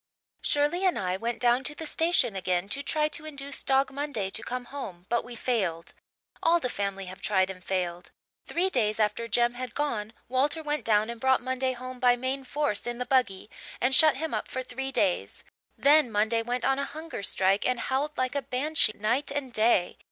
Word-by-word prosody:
"Shirley 295 +6 +2
and 370 -2 +2
I 185 -1 -1
went 230 +4 -3
down 245 +1 +3
to 295 - -3
the 320 - -6
station 315 - +2
again 185 0 0
to 275 +7 -3
try 300 +1 +1
to 305 - -5
induce 280 -2 -3
Dog 270 0 +2
Monday 270 -9 -2
to - - -3
come 250 0 -4
home 195 -11 -8
but 235 0 +1
we 245 0 -9
failed. 190 -9 -2 0.5
All 335 +1 +4
the 250 - -2
family 195 -1 -3
have 185 +1 -10
tried 190 -2 +1
and 185 -1 -12
failed. 180 -2 -3 0.4
Three 355 +3 +1
days 215 - +1
after 215 +2 0
Jem 240 +2 +2
had 250 +1 -6
gone 230 -7 -2
Walter 285 +6 0
went 300 0 -2
down 215 +1 +3
and 235 -1 -9
brought 265 0 +4
Monday 260 +1 -1
home 255 0 -8
by 245 -1 +5
main 260 +2 -3
force 290 -6 -1
in 240 0 -3
the 250 - -3
buggy 245 -9 +1 0.3
and 255 +2 +1
shut 310 +1 +7
him 320 +2 -3
up - - -2
for 260 - -4
three 265 +1 -5
days. 185 - 0 0.3
Then 290 -3 +5
Monday 220 +2 +2
went 245 +2 -2
on 270 0 +2
a 280 - 0
hunger 315 -6 -7
strike 195 +1 +2
and 250 -1 0
howled 280 +5 -1
like 255 0 0
a 285 - 0
Banshee 270 -1 +1
night 235 +7 0
and 280 -3 -4
day. 215 -5 +2
250 Hz, 205 wpm, -28 LUFS, 210-280 Hz, 0.5 s, shut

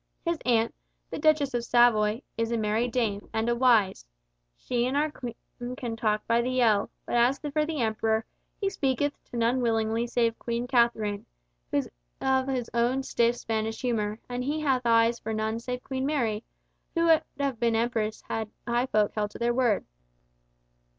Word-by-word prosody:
His 335 -1 0
aunt, 230 -1 +3 0.4
the - - -4
Duchess 295 -3 +3
of 240 -1 -1
Savoy, 235 -1 +3
is 230 0 -1
a 235 - +1
merry 220 +2 +1
dame, 225 -5 -1
and 220 +1 0
a 240 - +2
wise! 230 - +3 0.5
She 245 0 -1
and 265 +2 0
our 305 +1 +1
King 245 0 -8
can 235 -4 -4
talk 215 -1 0
by 235 0 +3
the 255 +1 -1
ell, 215 -4 +3 0.2
but - - -5
as 245 +3 +4
for 300 0 -1
the 315 -4 -2
Emperor, 220 0 0 0.3
he 400 - 0
speaketh 285 -5 0
to 240 - -7
none 235 +2 +2
willingly 225 0 +1
save 230 -1 0
Queen 235 0 -2
Katharine, 235 -5 +1 0.4
who - - 0
is - - -1 0.3
of 265 0 +1
his 255 -3 -1
own 245 +3 +1
stiff 235 -2 +2
Spanish 220 -1 -3
humour, 215 -4 -1
and 245 0 -3
he 295 +4 -1
hath 260 -4 +1
eyes 230 0 +4
for 220 0 -4
none 220 +1 -1
save 250 +1 -5
Queen 265 0 -2
Mary, 235 -7 0 0.5
who 335 - +2
would 325 -1 +6 0.2
have 275 -5 -1
been 235 -1 +2
his 225 - +3
empress 220 -3 -2
had 220 -1 -3 0.2
high 240 +2 +1
folk 210 -4 +2
held 210 -1 -1
to - - -10
their 235 0 +1
word. 240 -5 +2
235 Hz, 185 wpm, -27 LUFS, 225-255 Hz, 0.5 s, would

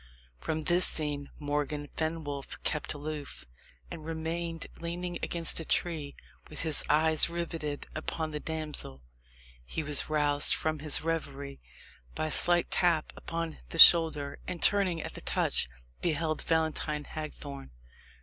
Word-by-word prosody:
From 160 - -3
this 175 +3 +6
scene 145 -2 -1
Morgan 145 0 -3
Fenwolf 155 -3 -4
kept 150 0 -2
aloof, 145 0 -7 0.5
and 165 -2 -7
remained 165 +1 -4
leaning 175 +1 -4
against 170 -1 0
a - - -4
tree, 155 -3 -1 0.3
with 150 - -5
his 155 -3 +3
eyes 160 +1 +5
riveted 165 -4 -4
upon 155 0 -4
the 150 - -4
damsel. 150 - -4 0.6
He 155 - -5
was 150 -1 0
roused 145 -1 +3
from 155 -1 -2
his 150 0 0
reverie 140 -4 -4 0.5
by - - -2
a 155 - -3
slight 175 +2 +6
tap 170 -4 +1
upon 165 -1 -5
the - - -6
shoulder; 150 -4 +7
and 175 - -5
turning 185 -5 +3
at - - -6
the - - -7
touch, - - 0 0.3
beheld 155 -1 -1
Valentine 160 -2 -1
Hagthorne. 145 -3 -8
155 Hz, 135 wpm, -29 LUFS, 145-165 Hz, 0.6 s, shoulder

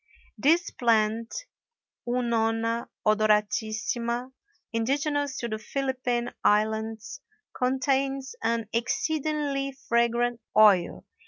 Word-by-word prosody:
This 320 +10 +2
plant, 230 - 0 0.6
Unona 230 -1 0 0.2
odoratissima, 220 +3 +1 0.4
indigenous 280 +4 0
to 235 - -3
the 215 -1 -4
Philippine 250 -1 -2
Islands, 220 +1 0 0.3
contains 265 +1 0
an 230 -1 0
exceedingly 285 +2 -1
fragrant 235 0 +1 0.2
oil. 200 -5 +5
235 Hz, 75 wpm, -27 LUFS, 220-265 Hz, 0.6 s, oil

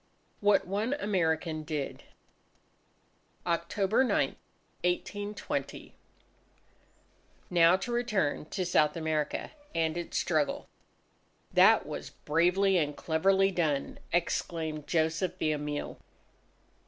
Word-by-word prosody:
WHAT 205 0 +3
ONE 210 +7 -1
AMERICAN 165 - 0
DID 150 -3 -4 1.4
October 185 +7 +1
9, 260 - +2 0.5
1820 205 +4 -3 1.6
Now, 170 0 +6
to 240 - -5
return 215 -12 0
to 185 +3 -3
South 160 -2 +2
America 155 -2 -2 0.2
and 160 -1 +1
its 175 -1 -3
struggle: 155 -5 0 0.9
"That - - +6
was - - -6
bravely 180 +5 +2
and 150 -2 -1
cleverly 195 +4 +2
done!" 155 -6 -1
exclaimed 160 -3 -1
Joseph 165 +2 0
Villamil. 150 -3 -2
170 Hz, 90 wpm, -30 LUFS, 155-195 Hz, 1.6 s, Now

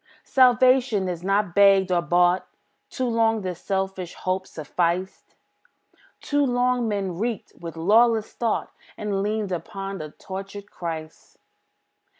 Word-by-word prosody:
Salvation 255 -4 +4
is 175 -2 -4
not 195 -1 +1
begged 195 -1 +5
or 175 -1 +3
bought; 175 +1 +2 0.4
Too 260 - -3
long 225 -2 +2
this 180 -3 -5
selfish 190 -2 -3
hope 185 0 -2
sufficed; 170 +4 -3 0.9
Too 290 0 +1
long 245 -2 +1
man 195 -4 -2
reeked 230 -1 -3
with 165 -1 -8
lawless 220 +5 +3
thought, 230 -2 -1 0.3
And 205 -2 -2
leaned 210 -1 -2
upon 195 +2 -5
a 155 - -6
tortured 195 +4 -8
Christ. 160 -2 -7
195 Hz, 125 wpm, -24 LUFS, 180-225 Hz, 0.9 s, begged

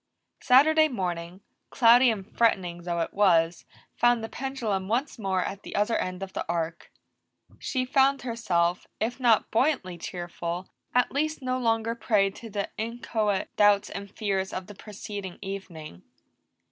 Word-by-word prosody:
Saturday 310 +5 +6
morning, 180 - -4 0.3
cloudy 245 +1 +6
and 205 -4 -4
threatening 180 -7 +1
though 170 -1 -2
it 165 - -3
was, 170 -4 +3 0.3
found 240 -1 +3
the 225 - -4
pendulum 230 -8 -3
once 245 +5 -1
more 190 -3 0
at 200 +1 -5
the - - -8
other 210 +3 +1
end 185 +1 -2
of 190 - -8
the - - -2
arc. 165 -1 -3 0.7
She 255 -3 -1
found 270 0 +3
herself, 180 -8 0
if 240 +4 -2
not 235 -4 +3
buoyantly 225 - +1
cheerful, 175 +1 -5 0.3
at 250 - +3
least 305 +1 -1
no 255 0 -1
longer 230 -1 +1
prey 210 -4 +2
to 225 +3 -10
the 200 -1 -3
inchoate 220 -3 -2
doubts 205 -1 +4
and 200 0 -6
fears 195 -2 -2
of 185 - -5
the 205 - -11
preceding 200 -2 -8
evening. 175 - -8
205 Hz, 150 wpm, -27 LUFS, 185-240 Hz, 0.7 s, Saturday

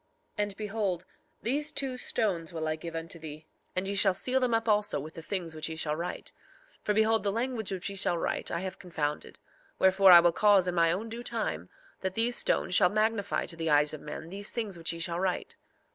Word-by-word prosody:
3:23 - - -12
And 205 -1 -5
behold, 205 -4 -2 0.4
these 290 +5 0
two 270 -2 -2
stones 195 -9 -1
will 160 -2 -3
I 155 - 0
give 165 +1 -7
unto 165 +1 -5
thee, 155 -1 -9 0.3
and 185 +1 -1
ye 200 - -1
shall 195 -1 +3
seal 255 +6 +1
them 250 -3 +2
up 225 0 -1
also 210 -1 +2
with 155 +3 -8
the 165 - -8
things 175 -2 -4
which 155 0 -4
ye 160 - -5
shall 155 -1 -1
write. 170 +3 -4 0.4
3:24 - - -26
For 210 - +2
behold, 220 +1 +3
the 200 - +1
language 230 -1 -2
which 185 -2 -3
ye 200 - -5
shall 185 -3 +1
write - - -1
I 170 - -2
have 190 -1 -5
confounded; 150 -4 -3 0.4
wherefore 190 0 +6
I 175 - +12
will 170 0 +5
cause 200 0 +4
in 180 - 0
my 165 -1 +4
own 200 +6 -2
due 230 +1 -6
time 210 - -3 0.3
that 190 0 -3
these 235 +2 +2
stones - - 0
shall 185 -1 +6
magnify 215 -1 0
to 170 - -6
the 165 -1 -2
eyes 150 0 +4
of 155 - -7
men 155 +2 -7
these 200 +3 -3
things 220 -5 -2
which 165 -1 -2
ye 170 - -6
shall 170 0 -3
write. 185 -1 -2
190 Hz, 235 wpm, -29 LUFS, 165-215 Hz, 0.4 s, I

